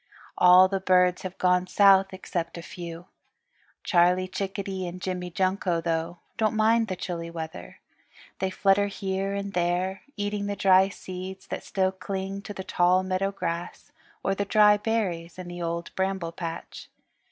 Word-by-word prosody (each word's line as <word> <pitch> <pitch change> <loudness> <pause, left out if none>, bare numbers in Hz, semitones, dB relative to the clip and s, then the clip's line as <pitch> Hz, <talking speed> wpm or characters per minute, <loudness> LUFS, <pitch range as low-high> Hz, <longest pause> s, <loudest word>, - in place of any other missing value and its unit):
All 180 +1 +7
the 195 0 -1
birds 180 -1 +3
have 185 0 -7
gone 180 0 +2
south 195 0 +5
except 175 -3 -4
a 170 - -7
few. 170 0 -8 0.8
Charlie 180 0 +3
Chickadee 190 -1 -4
and 175 +1 -7
Jimmy 180 -1 -4
Junko, 185 -1 0
though, 165 +1 -2 0.2
don't 220 0 +1
mind 225 +1 +3
the 185 - -3
chilly 170 -2 -5
weather. 160 - -7 0.6
They 190 - 0
flutter 195 +1 +2
here 195 0 -3
and 200 0 -4
there, 180 +2 0 0.2
eating 205 0 -2
the 205 - -2
dry 190 -1 +5
seeds 190 0 -8
that - - -4
still 190 -1 0
cling 195 +1 -5
to 205 - -8
the 190 - -5
tall 180 +1 +3
meadow 185 +1 -1
grass, 175 -3 -5 0.3
or 195 - +1
the 200 - -1
dry 210 0 +5
berries 185 -7 -2
in 185 -1 -7
the 175 0 -7
Old 170 0 -3
Bramble 190 -3 -2
Patch. 165 -1 -7
185 Hz, 160 wpm, -26 LUFS, 175-195 Hz, 0.8 s, All